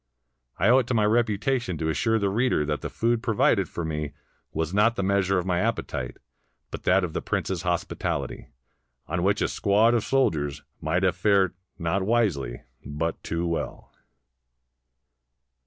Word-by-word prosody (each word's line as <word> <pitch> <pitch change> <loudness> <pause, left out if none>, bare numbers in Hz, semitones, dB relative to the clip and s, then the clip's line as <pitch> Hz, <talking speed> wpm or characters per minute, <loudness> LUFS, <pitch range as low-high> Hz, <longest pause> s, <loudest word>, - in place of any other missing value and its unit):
I - - +2
owe 130 +2 +7
it 125 - -2
to 125 - 0
my 105 -2 +3
reputation 115 - +1
to 80 +1 -1
assure 115 +9 +1
the 100 -2 0
reader 115 -8 +1
that 75 -2 -2
the - - -4
food 115 0 0
provided 115 -4 +2
for 85 - -4
me 75 -2 -3 0.4
was 80 +2 -2
not 110 +4 +4
the 100 - -1
measure 95 0 +2
of 90 - -1
my 90 -2 +1
appetite, 95 - -2 0.5
but - - -7
that 95 +1 +4
of 85 -3 -3
the - - -2
prince's - - -2
hospitality, - - -2 0.6
on 85 +3 -2
which 100 +3 +2
a - - +2
squad 105 +4 +3
of 115 -3 +2
soldiers 75 - 0 0.2
might 85 +5 0
have 90 -3 +2
fared 95 -1 +3 0.2
not 90 +2 0
wisely, 95 - 0 0.2
but 80 +3 -3
too 85 +1 -2
well. 85 -1 -4
95 Hz, 165 wpm, -26 LUFS, 80-115 Hz, 0.6 s, owe